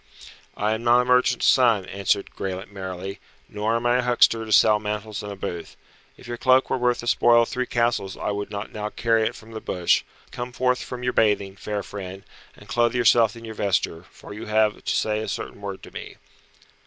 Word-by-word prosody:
"I 105 Hz, +1 st, +1 dB
am 110 Hz, +1 st, -4 dB
not 120 Hz, +1 st, +5 dB
a -, -, -3 dB
merchant's 125 Hz, 0 st, +3 dB
son," 115 Hz, -7 st, +4 dB
answered 100 Hz, +1 st, -1 dB
Graelent 95 Hz, +1 st, -5 dB
merrily, 95 Hz, 0 st, -6 dB, 0.3 s
"nor 105 Hz, +2 st, -1 dB
am 115 Hz, +1 st, -2 dB
I 120 Hz, +1 st, +3 dB
a -, -, +2 dB
huckster 120 Hz, -2 st, +3 dB
to 110 Hz, -, -8 dB
sell 105 Hz, 0 st, +5 dB
mantles 105 Hz, 0 st, -4 dB
in 105 Hz, -, -7 dB
a 100 Hz, -, -6 dB
booth. 85 Hz, -3 st, -6 dB, 0.4 s
If -, -, -14 dB
your 120 Hz, 0 st, -4 dB
cloak 130 Hz, +2 st, +3 dB
were -, -, +2 dB
worth 125 Hz, 0 st, +1 dB
the -, -, -8 dB
spoil 120 Hz, 0 st, +5 dB
of -, -, -5 dB
three 125 Hz, 0 st, -2 dB
castles 115 Hz, -5 st, 0 dB
I -, -, -2 dB
would 100 Hz, 0 st, -4 dB
not 100 Hz, 0 st, -6 dB
now 105 Hz, 0 st, -4 dB
carry 115 Hz, 0 st, +1 dB
it -, -, -5 dB
from 110 Hz, +1 st, -13 dB
the 110 Hz, -1 st, -7 dB
bush. 90 Hz, -1 st, +1 dB, 0.3 s
Come 120 Hz, 0 st, -6 dB
forth 125 Hz, 0 st, +1 dB
from 125 Hz, -1 st, -7 dB
your 125 Hz, -, 0 dB
bathing, 100 Hz, -3 st, +1 dB
fair 105 Hz, 0 st, -4 dB
friend, 95 Hz, -1 st, -8 dB, 0.3 s
and 105 Hz, -, -15 dB
clothe 120 Hz, +3 st, +1 dB
yourself 115 Hz, -2 st, +4 dB
in 115 Hz, 0 st, -10 dB
your 110 Hz, -, -7 dB
vesture, 90 Hz, -5 st, -1 dB
for -, -, -12 dB
you 105 Hz, -, -8 dB
have 110 Hz, 0 st, +1 dB
to -, -, -1 dB
say 105 Hz, -1 st, 0 dB
a 110 Hz, -, -4 dB
certain -, -, -5 dB
word 100 Hz, -2 st, -6 dB
to -, -, -11 dB
me." -, -, -9 dB
110 Hz, 220 wpm, -24 LUFS, 100-120 Hz, 0.4 s, not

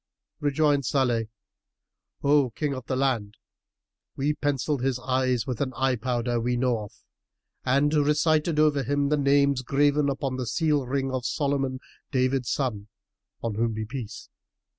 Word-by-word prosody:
Rejoined 145 Hz, -1 st, +2 dB
Salih, 120 Hz, -4 st, +1 dB, 1.0 s
"O 140 Hz, -2 st, +4 dB
King 145 Hz, +5 st, -2 dB
of 130 Hz, -2 st, -7 dB
the 130 Hz, -, -1 dB
land, 125 Hz, -6 st, -1 dB, 0.8 s
we 145 Hz, +2 st, 0 dB
pencilled 145 Hz, -1 st, -1 dB
his 130 Hz, -1 st, 0 dB
eyes 130 Hz, -1 st, 0 dB
with 125 Hz, -2 st, -4 dB
an 130 Hz, -2 st, -1 dB
eye 130 Hz, -1 st, +1 dB
powder 120 Hz, 0 st, -1 dB
we 125 Hz, +1 st, 0 dB
know 125 Hz, -2 st, +1 dB
of 105 Hz, -, -13 dB, 0.7 s
and 140 Hz, +3 st, +2 dB
recited 155 Hz, +2 st, +2 dB
over 150 Hz, -2 st, +3 dB
him 140 Hz, +2 st, 0 dB
the 150 Hz, -, +2 dB
names 140 Hz, -1 st, +3 dB
graven 145 Hz, +2 st, +2 dB
upon 135 Hz, -1 st, -2 dB
the 125 Hz, -2 st, -3 dB
seal 145 Hz, +3 st, +1 dB
ring 135 Hz, 0 st, -1 dB
of 130 Hz, -1 st, -2 dB
Solomon 135 Hz, 0 st, -1 dB, 0.3 s
David 130 Hz, -1 st, 0 dB
son 115 Hz, -6 st, -2 dB, 0.6 s
(on 115 Hz, -2 st, -1 dB
whom 115 Hz, +2 st, 0 dB
be 110 Hz, -, -3 dB
the -, -, -8 dB
Peace!) 115 Hz, -5 st, -7 dB
135 Hz, 155 wpm, -26 LUFS, 125-145 Hz, 1.0 s, O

